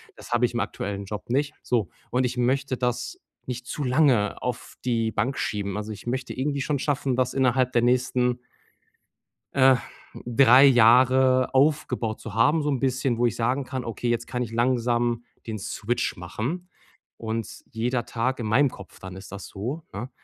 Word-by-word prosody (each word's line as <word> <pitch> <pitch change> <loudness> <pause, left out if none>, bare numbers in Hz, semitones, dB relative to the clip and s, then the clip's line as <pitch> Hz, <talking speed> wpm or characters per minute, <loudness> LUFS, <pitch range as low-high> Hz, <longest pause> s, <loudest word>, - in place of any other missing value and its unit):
das - - -13
habe 120 +1 +3
ich 120 - -3
im - - +1
aktuellen 100 0 -4
Job 105 +3 -7
nicht, 145 +4 0
so. 120 -4 0 0.2
Und, 125 +1 +1
ich 125 0 -3
möchte 130 +2 +1
das 125 -1 -2 0.3
nicht 125 -1 -6
zu 150 - -4
lange 125 -6 +2
auf 125 -1 -4
die 115 -3 +1
Bank 125 +6 -1
schieben. 100 -2 -2
Also, 105 +1 -5
ich 105 +2 -9
möchte 130 +1 -3
irgendwie 140 +1 -2
schon 145 +1 -1
schaffen, 140 -2 0
dass 130 0 0
innerhalb 130 -1 +2
der 120 - +3
nächsten 125 0 +2 1.2
äh, 135 -1 +6 0.5
3 125 +2 +6
Jahre 130 +1 +5
aufgebaut 130 -5 +1
zu 115 - -8
haben, 115 +9 +3
so 150 - -1
‘n 135 -3 0
bisschen, 130 -2 0
wo 120 - +2
ich 120 - +1
sagen 125 +4 0
kann: 130 0 -5
„Okay, 115 +1 -3
jetzt 120 0 -1
kann 125 -1 -3
ich 115 - -7
langsam 120 0 +1 0.2
den 110 -1 -3
Switch 110 +3 -2
machen. 125 - -4 0.5
Und, 110 -1 -3 0.2
jeder 120 +2 -1
Tag 130 +3 -2
in 115 - -3
meinem 130 +6 +3
Kopf 100 -5 -13
dann 95 -1 -9
ist 95 0 -11
das 100 -1 -7
so, 125 +12 -5
ne: 115 +6 -5
125 Hz, 180 wpm, -25 LUFS, 115-130 Hz, 1.2 s, äh